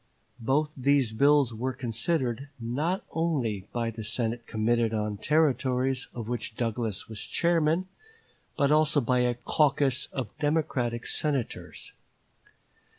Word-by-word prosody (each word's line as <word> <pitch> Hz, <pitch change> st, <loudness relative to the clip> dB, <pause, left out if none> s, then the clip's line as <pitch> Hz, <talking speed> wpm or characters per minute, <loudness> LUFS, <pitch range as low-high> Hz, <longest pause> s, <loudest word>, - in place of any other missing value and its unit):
Both 145 Hz, +6 st, +1 dB
these 135 Hz, -3 st, +2 dB
bills 140 Hz, 0 st, +4 dB
were 130 Hz, +4 st, -2 dB
considered 125 Hz, +2 st, -1 dB
not 145 Hz, +11 st, -1 dB
only 125 Hz, -, -1 dB
by 115 Hz, -1 st, -1 dB
the 110 Hz, 0 st, -7 dB
Senate 115 Hz, +1 st, -2 dB
Committee 115 Hz, +1 st, +1 dB
on 105 Hz, -1 st, -2 dB
Territories, 135 Hz, -2 st, +1 dB
of 115 Hz, -3 st, -5 dB
which 120 Hz, -2 st, -3 dB
Douglas 115 Hz, -3 st, -2 dB
was 110 Hz, -3 st, -7 dB
chairman, 170 Hz, +1 st, +1 dB, 0.7 s
but 140 Hz, 0 st, +3 dB
also 155 Hz, -1 st, +4 dB
by 125 Hz, -1 st, +1 dB
a 125 Hz, -1 st, +2 dB
caucus 140 Hz, 0 st, +2 dB
of 125 Hz, -7 st, -5 dB
Democratic 135 Hz, -6 st, 0 dB
Senators. 140 Hz, -6 st, -3 dB
125 Hz, 120 wpm, -28 LUFS, 115-145 Hz, 0.7 s, bills